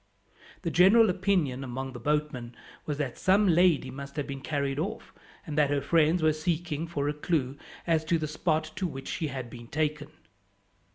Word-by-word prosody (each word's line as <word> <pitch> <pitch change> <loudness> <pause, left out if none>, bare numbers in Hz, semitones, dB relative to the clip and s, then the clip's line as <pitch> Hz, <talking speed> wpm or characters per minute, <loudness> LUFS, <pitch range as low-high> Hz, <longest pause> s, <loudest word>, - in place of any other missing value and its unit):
The 170 - -1
general 195 +5 +6
opinion, 180 -9 0
among 130 +1 -5
the 120 - -7
boatmen, 145 -3 -2 0.3
was 150 -2 -2
that 140 -5 -3
some 195 +2 +4
lady 170 -6 +3
must 140 +1 -8
have 145 -2 -2
been 135 -1 -6
carried 140 -1 -2
off, 205 +7 -4 0.3
and 155 -4 -5
that 145 -2 +4
her 145 0 +1
friends 160 +4 +2
were 155 -1 +4
seeking 160 0 -2
for 145 -4 -2
a 145 - 0
clue 150 -3 -1 0.3
as 165 -2 +2
to 170 +1 +2
the 155 -1 -3
spot 155 0 -1
to 185 - 0
which 135 -4 -7
she 160 - -2
had 130 -3 -5
been 120 0 -11
taken. 150 +1 -2
150 Hz, 185 wpm, -28 LUFS, 140-170 Hz, 0.3 s, general